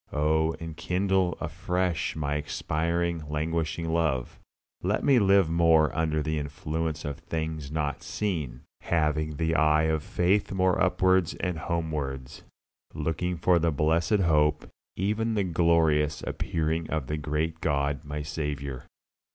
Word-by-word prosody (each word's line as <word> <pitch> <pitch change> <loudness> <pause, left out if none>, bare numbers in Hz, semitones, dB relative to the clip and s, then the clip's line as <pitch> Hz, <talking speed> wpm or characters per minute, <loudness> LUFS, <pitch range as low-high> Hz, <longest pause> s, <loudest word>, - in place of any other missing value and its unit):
Oh 80 +2 +2
enkindle 90 +3 0
afresh 90 +2 -1
my 75 -2 -2
expiring, 85 +3 -1
languishing 80 +1 -2
love; 80 -7 0 0.4
let 100 +4 0
me 135 -3 +5
live 100 -3 +5
more 80 -1 +3
under 80 -2 0
the 80 0 -1
influence 80 +1 -3
of 70 0 -4
"things 80 -3 -4
not 75 -3 -2
seen," 80 -12 -3 0.2
having 75 -2 0
the 80 +1 0
eye 75 -1 +4
of 80 -1 +1
faith 90 +6 +1
more 95 -1 +2
upwards 95 -1 +3
and 90 -3 -3
homewards, 75 -6 -3 0.5
looking 80 +3 -2
for 85 +2 +3
that 85 0 +1
blessed 80 +7 +2
hope, 75 -3 +2 0.3
even 110 +4 0
the 100 - +2
glorious 80 -4 +2
appearing 80 0 -2
of 80 -4 -1
the 75 +4 -3
great 80 +2 -2
God 70 -1 0
my 75 0 -5
Saviour. 70 -3 -4
80 Hz, 130 wpm, -27 LUFS, 75-85 Hz, 0.5 s, me